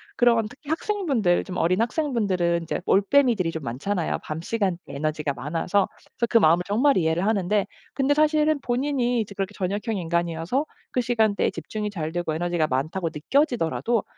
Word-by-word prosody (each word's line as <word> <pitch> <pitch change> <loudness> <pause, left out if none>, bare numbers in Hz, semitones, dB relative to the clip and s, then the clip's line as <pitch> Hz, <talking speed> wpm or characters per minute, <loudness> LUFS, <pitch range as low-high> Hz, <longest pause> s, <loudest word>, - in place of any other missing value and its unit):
그런 235 -3 +3
특히 280 +5 -14
학생분들 305 - +1
좀 185 -1 -6
어린 185 +6 +2
학생분들은 205 - 0
이제 165 - -3
올빼미들이 205 -3 +3
좀 160 -2 -6
많잖아요, 160 +10 -2
밤 155 +1 -5
시간대 195 -2 -1
에너지가 150 +1 -2
많아서. 165 +9 0 0.3
그래서 235 - +1
그 230 - +5
마음을 170 -2 +4
정말 255 +8 +3
이해를 165 +1 +1
하는데 205 -1 +1 0.3
근데 275 +1 +2
사실은 305 0 +3
본인이 245 -1 0
이제 205 -1 -6
그렇게 195 +1 -3
저녁형 205 +3 -2
인간이어서 170 - -1 0.3
그 250 - +1
시간대에 220 -4 +2
집중이 210 -1 -4
잘 160 -6 -4
되고 175 -2 -1
에너지가 170 -1 0
많다고 160 +7 -1
느껴지더라도 235 - +1
200 Hz, 420 characters per minute, -24 LUFS, 170-245 Hz, 0.3 s, 그